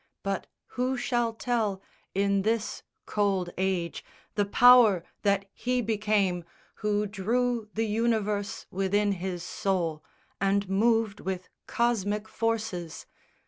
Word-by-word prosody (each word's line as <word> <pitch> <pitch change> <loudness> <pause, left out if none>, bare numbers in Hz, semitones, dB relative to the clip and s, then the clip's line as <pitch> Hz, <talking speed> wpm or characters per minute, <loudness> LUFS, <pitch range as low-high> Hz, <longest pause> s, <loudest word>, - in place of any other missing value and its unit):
But 195 -1 -2 0.2
who 255 +1 -1
shall 240 -1 0
tell 225 -4 -1 0.4
In 200 0 +2
this 220 +1 -1 0.2
cold 195 -4 0
age 185 -3 -1 0.3
the 205 - +1
power 230 -4 +7 0.2
that 200 -1 +2
he 250 +1 -1
became 210 -5 +1 0.3
Who 210 -1 0
drew 225 +3 -1
the 225 +1 +1
universe 215 -2 0
within 200 +2 +1
his 180 -2 -3
soul 180 -4 -1 0.4
And 195 0 +1
moved 220 +1 +2
with 185 -1 -4 0.2
cosmic 215 -3 0
forces? 220 -8 -2
205 Hz, 110 wpm, -28 LUFS, 190-225 Hz, 0.4 s, power